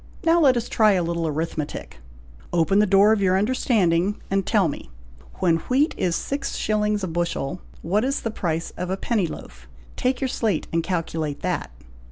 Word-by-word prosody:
Now 335 Hz, 0 st, +4 dB
let 265 Hz, -6 st, +5 dB
us 235 Hz, -, -2 dB
try 215 Hz, -2 st, +4 dB
a 180 Hz, -2 st, +1 dB
little 170 Hz, -1 st, -1 dB
arithmetic! 155 Hz, -, -4 dB, 0.5 s
Open 175 Hz, +4 st, +3 dB
the 210 Hz, -, +4 dB
door 200 Hz, +3 st, +5 dB
of 215 Hz, -, 0 dB
your 185 Hz, -1 st, +3 dB
understanding 205 Hz, -4 st, +1 dB
and 195 Hz, -1 st, 0 dB
tell 205 Hz, -6 st, +3 dB
me, 140 Hz, -, -6 dB, 0.5 s
when 170 Hz, -3 st, +2 dB
wheat 280 Hz, +5 st, +3 dB
is 175 Hz, -2 st, 0 dB
six 280 Hz, +1 st, -3 dB
shillings 210 Hz, -1 st, 0 dB
a -, -, -1 dB
bushel, 170 Hz, -1 st, -2 dB, 0.2 s
what 200 Hz, +7 st, +1 dB
is 275 Hz, +3 st, -1 dB
the 225 Hz, -, -3 dB
price 165 Hz, -5 st, -2 dB
of 180 Hz, 0 st, -3 dB
a 190 Hz, -, -1 dB
penny 205 Hz, -4 st, 0 dB
loaf. -, -, -10 dB, 0.3 s
Take 255 Hz, -1 st, 0 dB
your 265 Hz, -, 0 dB
slate 220 Hz, -9 st, -1 dB
and 165 Hz, -, +2 dB
calculate 160 Hz, -4 st, -3 dB
that." -, -, -2 dB
190 Hz, 185 wpm, -23 LUFS, 165-220 Hz, 0.5 s, let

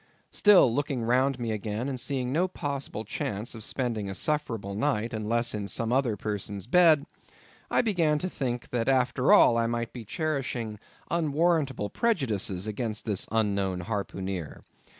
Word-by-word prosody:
Still, 190 Hz, -, +6 dB
looking 140 Hz, -2 st, -1 dB
round 130 Hz, +3 st, +2 dB
me 120 Hz, -2 st, -3 dB
again, 110 Hz, +3 st, -3 dB
and 135 Hz, -2 st, -3 dB
seeing 130 Hz, 0 st, -2 dB
no 170 Hz, +6 st, +2 dB
possible 140 Hz, -, -4 dB
chance 105 Hz, +2 st, -4 dB
of 110 Hz, -2 st, -7 dB
spending 115 Hz, -5 st, -2 dB
a 95 Hz, -, -5 dB
sufferable 115 Hz, -, -2 dB
night 105 Hz, +2 st, -1 dB
unless 115 Hz, +2 st, 0 dB
in 105 Hz, -2 st, -3 dB
some 115 Hz, +4 st, -1 dB
other 125 Hz, -5 st, +1 dB
person's 100 Hz, -1 st, -4 dB
bed, 155 Hz, +1 st, +5 dB, 0.6 s
I -, -, +2 dB
began 170 Hz, -9 st, +2 dB
to 180 Hz, -, -2 dB
think 125 Hz, -8 st, -4 dB
that 120 Hz, +1 st, 0 dB
after 130 Hz, 0 st, +2 dB
all 115 Hz, -, +7 dB
I 115 Hz, -, +1 dB
might 115 Hz, 0 st, -3 dB
be 120 Hz, -, -7 dB
cherishing 120 Hz, -, -3 dB, 0.3 s
unwarrantable 155 Hz, -, +1 dB
prejudices 110 Hz, -, 0 dB
against 110 Hz, 0 st, -3 dB
this 105 Hz, -4 st, -2 dB
unknown 100 Hz, -4 st, 0 dB
harpooneer. 95 Hz, -3 st, -4 dB
120 Hz, 150 wpm, -28 LUFS, 105-140 Hz, 0.6 s, all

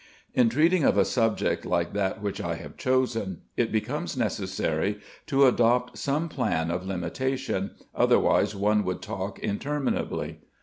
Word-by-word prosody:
In 125 Hz, -2 st, +4 dB
treating 160 Hz, +7 st, +3 dB
of -, -, +4 dB
a -, -, +5 dB
subject 115 Hz, -3 st, +1 dB
like -, -, 0 dB
that 100 Hz, 0 st, -1 dB
which 100 Hz, -1 st, -2 dB
I 85 Hz, -1 st, -2 dB
have 75 Hz, -3 st, -9 dB
chosen, 120 Hz, -8 st, 0 dB
it 120 Hz, -2 st, +1 dB
becomes 140 Hz, +8 st, -2 dB
necessary 100 Hz, -3 st, -1 dB, 0.3 s
to 140 Hz, -1 st, +5 dB
adopt 125 Hz, -1 st, +3 dB
some 150 Hz, +4 st, 0 dB
plan 85 Hz, -, -1 dB
of 90 Hz, +2 st, -3 dB
limitation, 100 Hz, +3 st, -2 dB, 0.2 s
otherwise -, -, +3 dB
one 105 Hz, +1 st, +2 dB
would 90 Hz, -1 st, -3 dB
talk 95 Hz, +1 st, -4 dB
interminably. 140 Hz, +7 st, -2 dB
110 Hz, 140 wpm, -27 LUFS, 95-130 Hz, 0.3 s, a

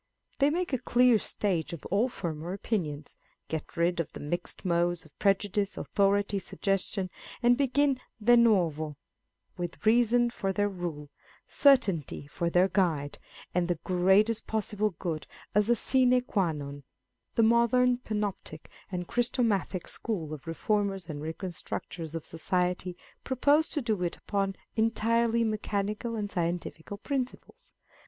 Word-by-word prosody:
They 280 Hz, +1 st, +5 dB
make 345 Hz, 0 st, -1 dB
a 260 Hz, -, +2 dB
clear 245 Hz, -1 st, +4 dB
stage 180 Hz, -6 st, -1 dB
of 170 Hz, -, -8 dB
all 215 Hz, +6 st, +3 dB
former 170 Hz, -5 st, -4 dB
opinions 160 Hz, -8 st, -3 dB
â€" -, -, -40 dB
get 160 Hz, +2 st, -5 dB
rid 170 Hz, +1 st, +2 dB
of 165 Hz, -, -2 dB
the -, -, -7 dB
mixed 175 Hz, +6 st, -4 dB
modes 175 Hz, -1 st, +1 dB
of 155 Hz, -, -20 dB
prejudice, 200 Hz, 0 st, +1 dB
authority, 200 Hz, 0 st, +1 dB
suggestion 195 Hz, 0 st, -1 dB
â€" -, -, -26 dB, 0.3 s
and 240 Hz, +1 st, +6 dB
begin 275 Hz, 0 st, +2 dB, 0.2 s
de 240 Hz, +3 st, +5 dB
novo, 165 Hz, -10 st, +3 dB, 0.6 s
with 175 Hz, +4 st, -5 dB
reason 240 Hz, +1 st, +4 dB
for 195 Hz, -5 st, -2 dB
their 205 Hz, +1 st, +1 dB
rule, 165 Hz, -6 st, -5 dB, 0.4 s
certainty 195 Hz, -, +3 dB
for 170 Hz, +4 st, -2 dB
their 180 Hz, +2 st, +4 dB
guide, 170 Hz, -7 st, 0 dB, 0.3 s
and 175 Hz, -1 st, +1 dB
the 175 Hz, -2 st, 0 dB
greatest 190 Hz, +5 st, +3 dB
possible 215 Hz, -1 st, 0 dB
good 160 Hz, -3 st, -3 dB, 0.3 s
as 210 Hz, +2 st, +3 dB
a 240 Hz, -, +5 dB, 0.2 s
bine 255 Hz, -1 st, +5 dB
qua 195 Hz, -8 st, 0 dB
nm. 145 Hz, -2 st, -6 dB, 0.5 s
The 230 Hz, -, +4 dB
modern 235 Hz, +2 st, +4 dB
Panoptic 210 Hz, -9 st, -4 dB, 0.2 s
and 180 Hz, -2 st, -3 dB
Christomathic 230 Hz, -7 st, 0 dB
School 170 Hz, -10 st, -4 dB
of 155 Hz, +1 st, -9 dB
reformers 195 Hz, +2 st, -1 dB
and 145 Hz, -2 st, -5 dB
reconstructors 165 Hz, -1 st, -5 dB
of 165 Hz, -, -5 dB
society 180 Hz, +1 st, -1 dB, 0.3 s
propose 285 Hz, +4 st, +3 dB
to 295 Hz, -, -2 dB
do 215 Hz, -5 st, 0 dB
it 175 Hz, -1 st, -2 dB
upon 195 Hz, -1 st, -1 dB, 0.2 s
entirely 230 Hz, +1 st, +2 dB
mechanical 215 Hz, +1 st, -2 dB
and 205 Hz, -2 st, -3 dB
scientific 170 Hz, -2 st, -3 dB
principles. 280 Hz, -, -4 dB
200 Hz, 140 wpm, -29 LUFS, 170-230 Hz, 0.6 s, and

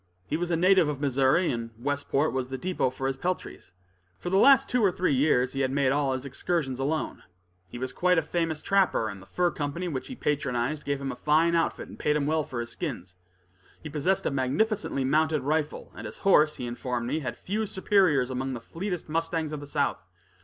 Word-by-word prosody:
He 150 Hz, -, -2 dB
was 175 Hz, +2 st, -2 dB
a 170 Hz, -, +2 dB
native 185 Hz, -1 st, +4 dB
of 145 Hz, -2 st, -3 dB
Missouri, 140 Hz, +5 st, +2 dB
and 115 Hz, -2 st, -4 dB
Westport 145 Hz, +3 st, 0 dB
was 130 Hz, -1 st, -2 dB
the 130 Hz, -, -4 dB
depot 175 Hz, -3 st, 0 dB
for 130 Hz, +1 st, -6 dB
his 135 Hz, 0 st, -1 dB
peltries. 180 Hz, -, -4 dB, 0.5 s
For 175 Hz, -, -5 dB
the 190 Hz, -, +3 dB
last 270 Hz, +4 st, +6 dB
two 245 Hz, -2 st, +1 dB
or 195 Hz, -, +5 dB
three 180 Hz, -3 st, 0 dB
years 130 Hz, -2 st, +2 dB
he 135 Hz, -, -3 dB
had 135 Hz, -1 st, +2 dB
made 135 Hz, -1 st, +2 dB
all 140 Hz, -1 st, +1 dB
his 130 Hz, +1 st, -4 dB
excursions 135 Hz, -1 st, -2 dB
alone. 150 Hz, +4 st, -2 dB, 0.5 s
He 120 Hz, -, -8 dB
was 130 Hz, +1 st, -4 dB
quite 180 Hz, 0 st, +2 dB
a 160 Hz, -, +3 dB
famous 165 Hz, -2 st, -2 dB
trapper, 190 Hz, -, +2 dB
and 100 Hz, -2 st, -8 dB
the 95 Hz, -, -15 dB
fur 175 Hz, -, +1 dB
company 150 Hz, +5 st, -3 dB
which 135 Hz, -6 st, -4 dB
he 260 Hz, -, -7 dB
patronized 145 Hz, -, -1 dB
gave 140 Hz, -1 st, -1 dB
him 135 Hz, -1 st, -3 dB
a -, -, -6 dB
fine 160 Hz, +3 st, +3 dB
outfit 165 Hz, -1 st, 0 dB
and -, -, -12 dB
paid 150 Hz, -, +1 dB
him 145 Hz, -2 st, +1 dB
well 155 Hz, +1 st, +1 dB
for 125 Hz, -5 st, -4 dB
his 120 Hz, 0 st, -5 dB
skins. 115 Hz, -, -5 dB, 0.7 s
He 155 Hz, -, -7 dB
possessed 165 Hz, +6 st, 0 dB
a -, -, +1 dB
magnificently 140 Hz, -, 0 dB
mounted 155 Hz, +2 st, +2 dB
rifle, 150 Hz, +1 st, -1 dB
and 110 Hz, -, -7 dB
his 105 Hz, -, -9 dB
horse, 155 Hz, -6 st, +5 dB
he 125 Hz, -, -5 dB
informed 120 Hz, 0 st, -3 dB
me, 150 Hz, +5 st, -1 dB
had 125 Hz, -5 st, -5 dB
few 215 Hz, +3 st, -2 dB
superiors 185 Hz, -10 st, +2 dB
among 130 Hz, +1 st, -2 dB
the -, -, -5 dB
fleetest 180 Hz, -, -5 dB
mustangs 165 Hz, -1 st, -1 dB
of 150 Hz, -, -3 dB
the 145 Hz, -, -9 dB
south. 145 Hz, -7 st, -1 dB
145 Hz, 220 wpm, -27 LUFS, 130-170 Hz, 0.7 s, last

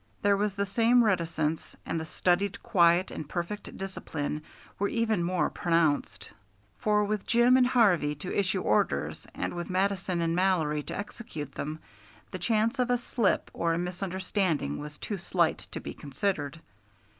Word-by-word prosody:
There 200 Hz, 0 st, +5 dB
was 205 Hz, 0 st, 0 dB
the 200 Hz, 0 st, 0 dB
same 230 Hz, +4 st, +4 dB
reticence, 165 Hz, -6 st, 0 dB
and 165 Hz, -, -2 dB
the 160 Hz, -, -4 dB
studied 185 Hz, +4 st, 0 dB
quiet 170 Hz, 0 st, +4 dB
and 150 Hz, -, -6 dB
perfect 175 Hz, +4 st, -4 dB
discipline 160 Hz, -6 st, -4 dB, 0.4 s
were 200 Hz, -, +2 dB
even 220 Hz, -5 st, +1 dB
more 180 Hz, +1 st, +1 dB
pronounced; 165 Hz, -4 st, 0 dB, 0.5 s
for 210 Hz, -1 st, +3 dB
with 210 Hz, -1 st, -2 dB
Jim 240 Hz, +2 st, +5 dB
and 255 Hz, -1 st, +5 dB
Harvey 180 Hz, -, +3 dB
to 165 Hz, +5 st, -5 dB
issue 195 Hz, -1 st, +1 dB
orders, 105 Hz, -, 0 dB
and -, -, -2 dB
with 175 Hz, 0 st, -5 dB
Mattison 185 Hz, -1 st, 0 dB
and 165 Hz, 0 st, +1 dB
Mallory 170 Hz, -5 st, +2 dB
to -, -, -6 dB
execute 205 Hz, -, -6 dB
them, 155 Hz, +3 st, -4 dB, 0.5 s
the -, -, -5 dB
chance 230 Hz, +3 st, +1 dB
of 250 Hz, 0 st, +2 dB
a 245 Hz, -, +3 dB
slip 235 Hz, -3 st, 0 dB
or 165 Hz, -1 st, 0 dB
a -, -, -1 dB
misunderstanding 180 Hz, -, -1 dB
was 150 Hz, 0 st, -8 dB
too 205 Hz, -3 st, -4 dB
slight 175 Hz, -2 st, +1 dB
to -, -, -4 dB
be -, -, -7 dB
considered. 145 Hz, +1 st, -3 dB
185 Hz, 160 wpm, -29 LUFS, 165-210 Hz, 0.5 s, There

